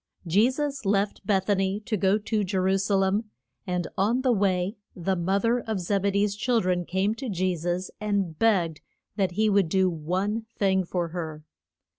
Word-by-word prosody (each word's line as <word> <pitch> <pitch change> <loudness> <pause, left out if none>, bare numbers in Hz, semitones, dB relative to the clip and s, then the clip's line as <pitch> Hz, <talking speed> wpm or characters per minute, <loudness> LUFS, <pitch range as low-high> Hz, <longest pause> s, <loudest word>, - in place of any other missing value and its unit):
Je 200 +8 +4
sus 280 0 -3
left 200 0 0
Beth 195 -3 +2
a 205 - +4
ny 195 +1 0
to 215 - -1
go 195 +1 +3
to 210 0 -1
Je 190 0 -2
ru 190 +1 +2
sa 200 +1 +1
lem, 195 +3 +1 0.4
and 180 -1 -1
on 225 +6 +1
the 255 - +3
way 195 -2 +1 0.2
the 190 +2 -1
mo 185 +3 +1
ther 230 +4 +2
of 220 -4 -3
Zeb 195 +2 0
e - - +4
dee's 200 0 +1
chil 235 +3 +1
dren 180 -3 0
came 190 +4 0
to 255 +2 -6
Je 185 -2 0
sus 175 +3 -3
and 200 -6 -1
begged 180 -9 +2 0.3
that 190 -3 0
he 215 +4 +2
would 200 -5 +3
do 190 +1 +2
one 190 +8 -2
thing 190 -2 +2
for 175 -1 -2
her. 160 -3 -5
195 Hz, 200 wpm, -26 LUFS, 180-210 Hz, 0.4 s, Je